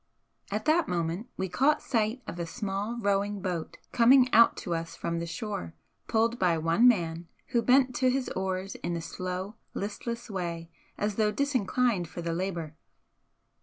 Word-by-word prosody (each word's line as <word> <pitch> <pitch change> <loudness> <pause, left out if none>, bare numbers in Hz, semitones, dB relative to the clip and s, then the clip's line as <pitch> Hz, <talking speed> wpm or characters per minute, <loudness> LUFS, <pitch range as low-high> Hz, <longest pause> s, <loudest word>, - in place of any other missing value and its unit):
At 210 +2 -3
that 320 +2 +3
moment 175 +6 -2
we 190 - -1
caught 280 - +3
sight 230 +1 0
of 175 - -7
a 170 - -3
small 205 +2 -3
rowing 200 -1 0
boat 180 -4 -4
coming 250 +1 +5
out 230 +1 +6
to 175 - -1
us 165 0 -4
from 170 0 -2
the 170 - -4
shore, 195 0 -5 0.3
pulled 230 +2 +1
by 175 -3 +3
one 165 +9 +4
man, 170 -7 +1 0.2
who 240 -2 +2
bent 255 +2 +4
to 255 - +3
his 260 0 0
oars 190 0 -3
in 175 - -4
a - - -4
slow, 185 +4 -5 0.2
listless 235 +4 -4
way 170 -5 -4 0.3
as 210 -1 -1
though 215 -1 +3
disinclined 250 - +1
for 170 - -7
the 165 0 -1
labour. 170 -3 -3
200 Hz, 165 wpm, -29 LUFS, 170-235 Hz, 0.3 s, out